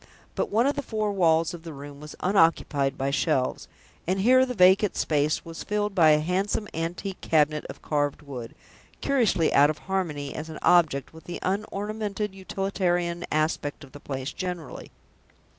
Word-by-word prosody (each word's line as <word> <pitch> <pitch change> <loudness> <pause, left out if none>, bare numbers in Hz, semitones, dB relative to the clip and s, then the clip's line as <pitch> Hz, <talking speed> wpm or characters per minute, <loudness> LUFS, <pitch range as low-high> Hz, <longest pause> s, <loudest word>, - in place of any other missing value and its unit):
But - - -1
one 225 +4 +2
of 285 - +2
the - - -2
four 215 -5 -2
walls 165 -3 +2
of 175 - -8
the 165 -1 -8
room 140 0 -10
was 150 0 -10
unoccupied 165 -7 +2
by 135 +1 -1
shelves, 140 -3 0 0.4
and 190 +2 +1
here 255 +4 +5
the 250 - -4
vacant 190 +1 +5
space 150 0 0
was 165 0 -8
filled 210 -1 -1
by 165 -5 +5
a 150 0 +5
handsome 195 +5 -1
antique 175 +4 -4
cabinet 150 -1 +2
of - - -10
carved 145 0 -1
wood, 125 -5 -8 0.4
curiously 220 - +2
out 145 +1 +6
of 155 - -2
harmony, 170 -7 -3
as 160 +1 -6
an 155 - -7
object, 160 -6 +3
with 160 - -14
the 175 - -5
unornamented 210 +1 -3
utilitarian 180 -3 -1
aspect 155 -1 -1
of 135 - -13
the 145 - -11
place 135 -1 -5
generally. 180 -6 -6
170 Hz, 170 wpm, -26 LUFS, 150-195 Hz, 0.4 s, out